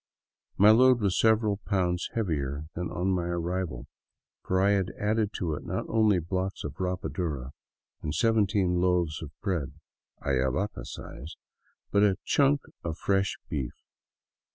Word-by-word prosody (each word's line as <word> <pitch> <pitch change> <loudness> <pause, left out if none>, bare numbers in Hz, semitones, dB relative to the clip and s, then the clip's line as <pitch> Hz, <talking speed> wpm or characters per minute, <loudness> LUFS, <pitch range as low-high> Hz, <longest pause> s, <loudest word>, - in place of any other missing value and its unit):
My 105 +3 +8
load 125 +2 +6
was 100 -4 +1
several 110 -2 +3
pounds 90 -4 -1
heavier 75 -9 -1
than 90 0 -3
on 90 +2 -1
my 90 -2 0
arrival; 85 -5 -2 0.6
for 95 - +1
I 100 +2 +4
had 95 -2 +1
added 105 0 +1
to 85 -5 -2
it - - -5
not - - -3
only 110 -3 +4
a - - -1
block 95 +2 -1
of 75 -1 -6
rapadura 85 -7 -3 0.5
and 75 - -3
seven 110 +5 +3
teen 95 -4 +1
loaves 90 -4 +1
of 80 - -6
bread 85 -9 -2 0.3
— - - -25
Ayavaca 70 +9 0
size 75 +6 -8 0.3
— - - -42
but 100 - +4
a 105 - +6
huge 95 -1 -2
chunk 140 0 +3 0.2
of 80 -1 -3
fresh 95 +1 +1
beef. 65 -5 -3
90 Hz, 160 wpm, -28 LUFS, 80-105 Hz, 0.6 s, My